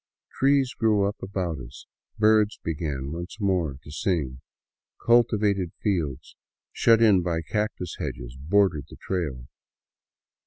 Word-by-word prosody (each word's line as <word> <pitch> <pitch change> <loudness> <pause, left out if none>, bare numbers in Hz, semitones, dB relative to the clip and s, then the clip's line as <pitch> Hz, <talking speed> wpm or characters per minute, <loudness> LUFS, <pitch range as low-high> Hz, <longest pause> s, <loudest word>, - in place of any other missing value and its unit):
Trees 135 -1 +2
grew 105 -3 +2
up 100 - -5
about 90 -5 -3
us, 65 +2 -11 0.3
birds 110 -1 +4
began 75 -4 -3
once 85 +6 -7
more 90 -9 0
to 75 - -11
sing, 75 -7 -2 0.6
cultivated 105 -6 +3
fields 80 -10 -2 0.4
shut 115 0 +4
in 100 -5 +5
by 85 -2 -1
cactus 105 -3 -3
hedges - - -5
bordered 75 0 +1
the - - -11
trail. 75 -10 -3
90 Hz, 120 wpm, -26 LUFS, 75-105 Hz, 0.6 s, in